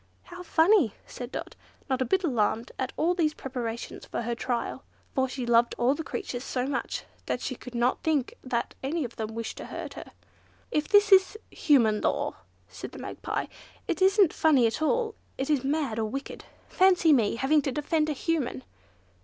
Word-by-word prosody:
"How 355 0 -10
funny," 330 - +4
said 245 0 -8
Dot, - - -6 0.3
not 260 -2 0
a - - +2
bit 380 +11 +1
alarmed 230 -5 0
at 260 0 -1
all 340 +3 +2
these 315 -4 +1
preparations 240 -3 -5
for - - -4
her 240 +1 -1
trial, 240 0 -3 0.3
for 265 -1 +1
she 255 -1 -4
loved 235 0 +3
all 245 +3 +3
the 320 - -4
creatures 245 -5 -5
so 250 -2 -2
much, 280 - -3 0.2
that - - -1
she 255 - -3
could 250 0 -10
not 240 +2 +1
think 300 -5 0
that 240 -2 -2
any 305 +4 -1
of 240 -2 -7
them 220 0 -4
wished 230 0 -4
to - - -7
hurt - - -6
her. - - -9 0.6
"If 300 0 0
this 410 0 +5
is 380 +2 +6
human 235 - +3
law," - - 0 0.3
said - - -9
the - - -9
Magpie, - - -4 0.4
"it - - -2
isn't 385 -2 +5
funny 285 -7 +4
at 230 +6 0
all; 450 +8 +1 0.2
it 270 +3 -1
is 280 -4 +2
mad, 275 -5 -1
or 220 - +1
wicked. 275 +5 -6 0.2
Fancy 365 -4 +4
my 230 -6 +3
having 295 +4 +3
to 275 - -2
defend 305 +3 0
a - - +1
Human!" 280 - -2
270 Hz, 190 wpm, -28 LUFS, 240-320 Hz, 0.6 s, is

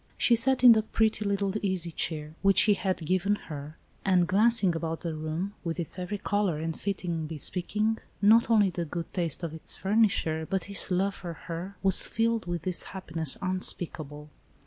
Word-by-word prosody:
She 240 - +4
sat 255 +2 +3
in 245 - +10
the 220 -1 +5
pretty 220 0 0
little 200 -1 0
easy 185 -4 -1
chair, 155 -1 -4
which 195 -1 +6
he 210 - +4
had 185 -4 -2
given 185 +4 +1
her, 150 -4 -9 0.3
and, 180 -3 +3
glancing 205 -1 +4
about 165 0 -3
the 165 -2 -3
room, 155 +6 -4
with 170 0 -3
its 170 +2 -4
every 180 +3 -4
color 205 -5 0
and 160 +1 -3
fitting 175 -5 -3
bespeaking, 200 +8 -2 0.2
not 220 +4 +5
only 210 -4 +4
the 170 -1 -3
good 170 +2 -6
taste 170 -2 -2
of 165 -2 -4
its 160 - -1
furnisher, 190 -6 +1
but 190 -2 -1
his 200 -1 0
love 195 +2 +1
for 175 -3 -7
her, 170 +4 -7
was 190 -1 +3
filled 230 -3 0
with 175 -2 -3
this 185 -2 0
happiness 165 -6 -3
unspeakable. 155 -5 -2
185 Hz, 180 wpm, -28 LUFS, 165-205 Hz, 0.3 s, in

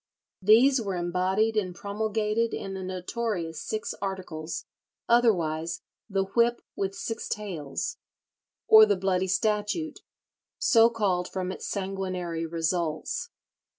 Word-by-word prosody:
These 235 +7 +6
were 195 -4 -2
embodied 185 +5 +1
and 185 -4 -1
promulgated 215 +3 -1
in 195 - -5
the 190 - -5
notorious 185 -2 -3
Six 215 0 -3
Articles, 180 -5 -4 0.4
otherwise 170 -9 +2 0.3
"the 195 -1 +1
whip 235 +5 +1
with 195 0 -2
six 225 +3 -4
tails," 200 - -4 0.7
or 220 0 +9
the 205 -2 +2
Bloody 190 0 +1
Statute, 210 - 0 0.6
so 230 -3 +5
called 195 -6 0
from 185 -1 -3
its - - -6
sanguinary 185 -4 -3
results. 165 - -1
195 Hz, 115 wpm, -27 LUFS, 180-220 Hz, 0.7 s, or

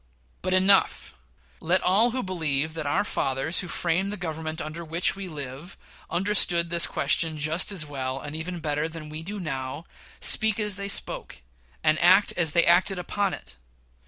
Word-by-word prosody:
But 185 +1 0
enough! 190 +1 +2 0.5
Let 175 +3 0
all 205 +6 +3
who 255 +2 -3
believe 155 -5 -1
that 155 -3 -5
"our 145 - +1
fathers, 135 -3 -1
who 180 - -4
framed 180 +3 -1
the 210 - -3
Government 160 -2 -5
under 160 +2 -6
which 165 +4 +1
we 195 -1 -6
live, 145 +2 -8 0.3
understood 175 -3 +2
this 170 0 +3
question 155 +2 +1
just 155 +6 0
as 180 -6 -1
well, 135 -2 -4
and 145 +2 -8
even 170 +2 -6
better 150 0 -1
than 160 -2 -9
we 155 +1 -6
do 200 +5 -6
now," 135 -2 -5 0.3
speak 220 0 +6
as 210 -2 0
they 200 0 -5
spoke, 195 - 0 0.4
and 155 0 +2
act 185 +4 +5
as 165 -3 +2
they 170 -1 +3
acted 180 +3 +3
upon 195 +2 -2
it. 60 -1 -15
170 Hz, 175 wpm, -25 LUFS, 155-185 Hz, 0.5 s, speak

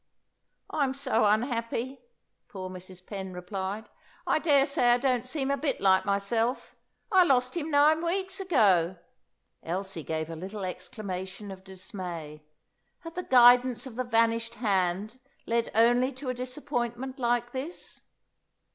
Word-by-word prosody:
"I'm 275 -3 0
so 260 -5 +2
unhappy," 230 +3 0 0.5
poor 185 -2 -7
Mrs. 185 0 -10
Penn 190 -2 -6
replied. 190 +4 -5 0.4
"I - - +2
daresay 280 -5 +4
I - - +4
don't 255 -1 0
seem 275 0 -1
a 280 - +1
bit 280 -2 -1
like 190 -1 +4
myself. 225 +5 0 0.4
I 375 -2 +7
lost 255 -4 +2
him 325 -2 -2
nine 305 +2 +4
weeks 380 +3 -1
ago." 195 - +3 0.6
Elsie 185 0 -4
gave 160 +1 -3
a - - -5
little 190 +4 -6
exclamation 185 +1 -6
of 190 0 -10
dismay. 180 -5 -7 0.6
Had 330 -2 -9
the 360 - -3
guidance 245 -3 +5
of 255 -4 -9
the 255 - -1
vanished 230 -1 +1
hand 205 +1 0 0.3
led 235 0 0
only 245 +3 +4
to 260 +1 -6
a - - 0
disappointment 255 0 -3
like 240 -1 0
this? 275 +7 -6
235 Hz, 140 wpm, -28 LUFS, 190-260 Hz, 0.6 s, I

